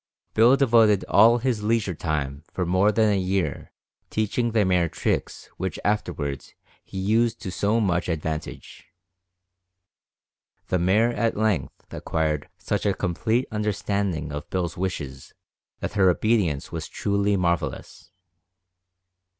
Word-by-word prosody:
Bill 120 +5 +5
devoted 115 -6 +4
all 115 +3 +6
his 120 -3 -1
leisure 105 -3 0
time 75 -3 -3
for 90 - -2
more 95 +4 +3
than 110 0 +3
a 100 - +1
year 95 -5 -2 0.4
teaching 110 +3 0
the 110 -3 +2
mare 90 -2 +2
tricks - - -2
which 95 -3 -3
afterwards 80 -10 -2 0.3
he 95 - -10
used 110 +4 +1
to 95 - -4
so 105 +4 +1
much 90 -5 0
advantage. 80 -1 -5 1.8
The 90 - +1
mare 105 +7 +3
at 115 0 0
length 105 - -2
acquired 75 -2 -2
such 105 +2 -2
a 100 - +1
complete 110 +8 0
understanding 100 -6 -2
of 75 +1 -6
Bill's 90 -2 -2
wishes 70 -8 -5 0.5
that - - -3
her 95 -3 +4
obedience 90 -7 +1
was - - -5
truly 100 0 0
marvelous. 85 -1 -2
95 Hz, 125 wpm, -24 LUFS, 85-110 Hz, 1.8 s, all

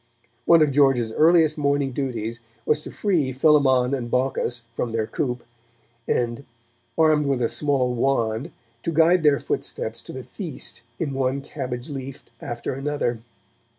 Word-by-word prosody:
One 165 -2 +6
of 150 - +1
George's 135 -5 +3
earliest 160 +2 +4
morning 140 -1 +1
duties 120 -4 -3 0.3
was 150 0 +2
to - - -9
free 170 -10 0
Philemon 135 -2 +4
and 125 -3 -2
Baucis 125 -1 -1
from 120 - -2
their 110 -1 -1
coop, 125 +2 -3 0.6
and, 120 +2 -1 0.5
armed 155 -2 +4
with 135 -2 +1
a 120 - +2
small 135 -3 +1
wand, 120 -2 0 0.3
to 165 - -2
guide 165 +3 +4
their 150 -2 +4
footsteps - - -4
to - - -10
the - - -7
feast - - -6 0.2
in 145 -4 -2
one 135 +1 0
cabbage 130 -3 -5
leaf 135 0 -7 0.2
after 120 +2 -4
another. 135 -4 -2
135 Hz, 150 wpm, -23 LUFS, 125-150 Hz, 0.6 s, One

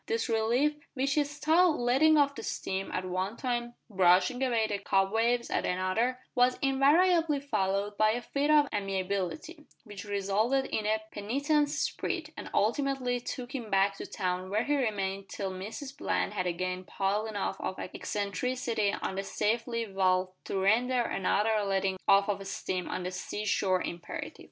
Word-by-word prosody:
This 460 +1 0
relief, 240 +6 +1 0.2
which 275 +1 +1
he 300 - +3
styled 310 +4 +2
"letting 270 +6 +4
off 285 -1 +3
the - - -7
steam" 190 0 -3
at 185 - -2
one 185 +4 -2
time, 240 -2 -2
"brushing 185 +4 +3
away 235 -4 +2
the 205 -2 -2
cobwebs" 225 +5 +1
at - - 0
another, 185 +8 0 0.2
was 250 0 +3
invariably 300 +3 +3
followed 200 -6 -1
by 215 0 +4
a 240 - -2
fit 285 +4 -1
of 300 -1 +5
amiability, 195 - -3 0.2
which 205 -3 -9
resulted 210 +6 0
in 215 -4 -2
a 215 0 +1
penitent 285 +8 +1
spirit, 305 +2 -2
and - - -7
ultimately 250 +2 +1
took 245 +1 -6
him 240 -5 -5
back 195 0 +3
to - - -6
town 185 -1 -2
where 215 +3 +1
he 290 +2 +1
remained 195 -6 -2
till 195 0 -4
Mrs 220 +9 -7
Bland 280 - -1
had 185 -3 -1
again 185 +1 -2
piled 200 +3 -1
enough 205 -2 -2
of 190 - -4
eccentricity 215 +2 -2
on - - -2
the 195 +1 -3
safety 230 +3 -1
valve 185 -2 +1
to - - -3
render 240 +6 +3
another 215 0 +1
letting 195 -1 0
off 200 0 +5
of 200 -1 -2
steam 185 -2 -3
on 185 - -3
the 180 - -3
sea 185 +3 -5
shore 185 -2 +1
imperative. 175 0 -6
215 Hz, 165 wpm, -30 LUFS, 195-265 Hz, 0.2 s, of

